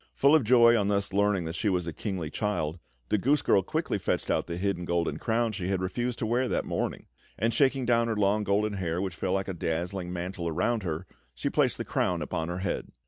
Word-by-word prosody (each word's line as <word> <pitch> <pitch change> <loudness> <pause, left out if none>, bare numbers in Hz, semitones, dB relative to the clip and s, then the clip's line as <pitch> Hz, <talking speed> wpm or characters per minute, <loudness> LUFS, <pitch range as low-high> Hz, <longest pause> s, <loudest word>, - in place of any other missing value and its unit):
Full 140 +2 +4
of 155 -4 +5
joy 120 0 +6
on 105 -3 +2
thus 100 -1 0
learning 100 -3 +2
that 80 - -4
she 105 +4 0
was 90 -3 0
a 85 - -4
kingly 90 -4 -4
child, 90 -7 -2 0.3
the 105 - +2
goose 140 +8 +2
girl 95 - +4
quickly - - -2
fetched - - -1
out - - 0
the 85 0 -4
hidden 95 -1 -1
golden 85 -1 -1
crown 115 0 0
she 95 -4 -4
had 95 -1 0
refused 120 +6 -2
to - - -2
wear 120 +3 +1
that - - -1
morning; - - -3 0.3
and 115 +3 +1
shaking 135 +1 +2
down 115 -1 +3
her 115 - 0
long 105 +1 +2
golden 105 +1 +1
hair, 90 -3 -2
which 95 -2 -2
fell 90 +1 -2
like 95 0 -1
a 95 - -3
dazzling 90 +2 -3
mantle 90 0 -4
around 90 +8 0
her, 85 -1 -3 0.3
she - - -2
placed - - +2
the - - -4
crown 90 -3 0
upon 80 +1 -3
her 90 - -3
head. 90 - -2
95 Hz, 235 wpm, -28 LUFS, 90-115 Hz, 0.3 s, joy